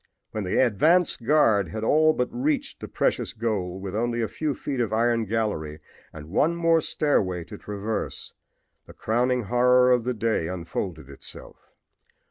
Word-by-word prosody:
When 110 -2 -3
the 90 - -1
advance 155 - +3
guard 115 -7 +3
had 110 0 -5
all 155 +6 +4
but 125 -4 -1
reached 275 +2 -1
the - - -7
precious - - -1
goal, 100 -5 -2
with 95 -1 -6
only 120 +1 -1
a - - 0
few 150 +2 -3
feet 135 -3 -4
of 115 -3 0
iron 115 +1 +1
gallery 100 -9 -2 0.3
and 75 -1 -10
one 160 - +2
more 165 -1 +3
stairway 95 - 0
to 105 +5 -10
traverse, 105 +2 -4 0.5
the - - -12
crowning 125 +2 0
horror 125 +4 +4
of 125 -2 +3
the 125 +1 -2
day 110 -6 0
unfolded 85 -3 -5
itself. 70 - -11
115 Hz, 160 wpm, -25 LUFS, 100-130 Hz, 0.5 s, all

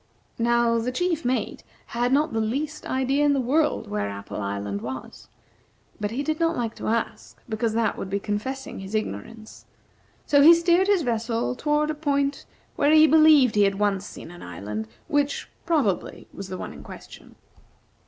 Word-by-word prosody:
Now, 235 0 +2
the 240 +2 -2
chief 335 +3 -1
mate 250 +1 -2 0.3
had 240 +1 0
not 290 -1 +2
the 225 - 0
least 285 +8 -3
idea 265 +2 +1
in 290 -1 +4
the 275 - +1
world 295 +5 +1
where 100 -1 -2
Apple 100 +1 -6
Island 100 0 -3
was, 130 +3 -8 0.7
but 205 - -1
he 250 +6 -3
did 310 +1 -2
not 335 0 +1
like 230 -2 -2
to - - -5
ask, 230 +1 -3
because 220 0 -1
that 225 0 0
would 190 - -5
be 200 +1 -1
confessing 220 +7 -4
his 195 +2 -6
ignorance; 220 +1 -6 0.6
so 285 -1 +4
he 330 +4 +9
steered 345 +3 +3
his 400 -5 +3
vessel 230 0 -1
toward 300 +3 +1
a - - -2
point 285 -2 -1 0.3
where 290 +1 +3
he 310 0 +8
believed 310 -6 +6
he 210 - +3
had 195 -1 +2
once 200 -2 0
seen 175 - -10
an 175 - -12
island, 105 +5 -6 0.2
which, 290 0 0 0.2
probably, 285 - 0
was 195 - -7
the 185 - -5
one - - -6
in - - -11
question. - - -12
240 Hz, 180 wpm, -25 LUFS, 205-295 Hz, 0.7 s, he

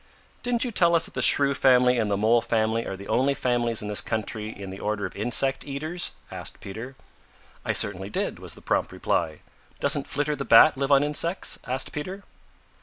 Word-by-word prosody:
"Didn't 245 -1 0
you 245 - -3
tell 170 -5 +3
us 165 - +3
that - - -7
the - - -3
Shrew 140 -1 +4
family 125 -2 +4
and 110 -2 0
the 100 - 0
Mole 115 +3 +3
family 115 0 0
are 95 - -4
the 100 - -10
only 135 +2 +1
families 120 -4 0
in - - -5
this 105 0 +1
country 110 -1 -4
in 100 -3 -8
the 95 - -8
order 105 -1 -2
of - - -7
insect 125 +5 +1
eaters?" 155 +5 -2 0.2
asked - - -5
Peter. 110 +7 -8 0.7
"I - - -1
certainly 95 -1 0
did," - - -3
was - - -8
the - - -15
prompt - - 0
reply. 80 -2 -2 0.4
"Doesn't 140 0 0
Flitter 150 0 -1
the 140 - -4
Bat 155 +1 +7
live 135 +1 -2
on 140 0 +5
insects?" 165 +5 -1
asked 130 +2 -1
Peter. 185 +7 -6
125 Hz, 200 wpm, -25 LUFS, 110-145 Hz, 0.7 s, Bat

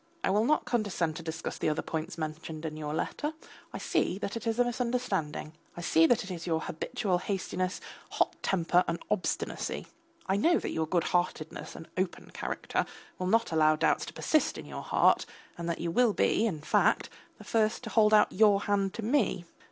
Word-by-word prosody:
I - - +2
will 210 +3 +3
not 305 +4 +2
condescend 190 -9 0
to - - -6
discuss 160 0 -5
the - - +1
other 155 - -1
points 160 +1 -4
mentioned 155 0 -5
in 155 -1 -4
your 150 -1 -4
letter. 300 - -2 0.4
I - - -5
see 180 - 0
that 200 +1 -4
it 230 0 -4
is 225 0 0
a 245 - +5
misunderstanding. 235 -11 -2 0.2
I - - -4
see 165 -1 +4
it 200 -2 +2
is 170 -1 -6
your 160 -1 +1
habitual 185 +3 -1
hastiness, 185 -1 -2 0.3
hot - - +1
temper 180 -1 +2
and 165 - 0
obstinacy. 210 -3 -2 0.4
I 190 - +1
know 335 +11 +4
that - - -3
your 160 -1 -1
goodheartedness 170 -1 -1
and 160 - -9
open 185 -1 -3
character - - -2 0.3
will 185 - -1
not 230 0 +2
allow 155 -1 +4
doubts - - +1
to - - -8
persist 310 - +1
in - - -7
your - - -6
heart, - - +3 0.3
and 170 0 -4
that 170 - -2
you 170 0 -2
will 240 +3 +4
be, 225 - +2
in 160 -8 -3
fact, - - +2 0.3
the - - -12
first 220 +1 +1
to 220 - -6
hold 215 -2 +5
out 215 -1 +6
your 205 -2 +5
hand 200 -1 0
to 230 - -4
me. 215 -7 +1
185 Hz, 195 wpm, -30 LUFS, 160-220 Hz, 0.4 s, out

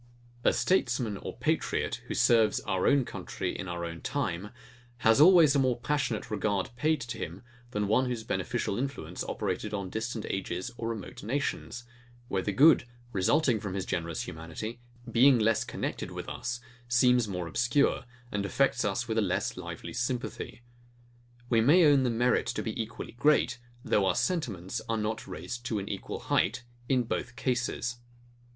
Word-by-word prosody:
A - - +5
statesman 125 - +1
or - - -7
patriot, - - 0
who - - -3
serves 115 -3 +4
our 95 -2 0
own 140 -3 +4
country - - -4
in 95 - -5
our 85 -1 -3
own 85 -1 -6
time, 105 -9 -2 0.6
has 115 +5 +6
always 165 -4 +7
a - - +4
more 130 -3 +2
passionate 130 -5 -1
regard 105 -2 0
paid 155 +3 +1
to 115 -1 -5
him, 85 +7 -6 0.3
than 105 -4 -1
one 125 +5 +3
whose 120 -3 -3
beneficial 95 - -2
influence 135 +1 -4
operated 105 0 -3
on 95 -2 -4
distant 110 0 -3
ages 95 +2 -3
or 115 -1 -3
remote 110 -5 -6
nations; 120 0 -3 0.5
where 95 - 0
the 105 - -1
good, 145 +7 +6 0.3
resulting 120 +5 +3
from 100 -2 -5
his 95 -2 -2
generous 85 -1 -2
humanity, 80 +9 -6 0.3
being 130 +3 +6
less 110 0 +2
connected - - -4
with - - -6
us, 120 0 -4 0.3
seems 120 -1 +4
more 90 -3 -3
obscure, 120 - +1 0.3
and 100 -1 -1
affects 135 +7 +1
us 105 +4 -1
with 110 -1 +1
a - - +3
less 95 -4 0
lively 85 - -7
sympathy. 120 +1 -3 0.8
We 115 -2 +3
may 160 +9 +6
own 145 -2 +6
the 130 - +2
merit 120 +2 +2
to - - -2
be 110 0 -2
equally 110 +1 -7
great, 125 -1 +2 0.3
though 100 -2 +3
our - - +2
sentiments 120 - -1
are 115 - +1
not 110 +1 -2
raised 95 +7 -6
to 115 -2 -1
an 100 0 -4
equal - - -5
height, 120 - +1 0.3
in 130 -2 +3
both 120 +1 -3
cases. 120 0 -1
115 Hz, 170 wpm, -29 LUFS, 100-125 Hz, 0.8 s, always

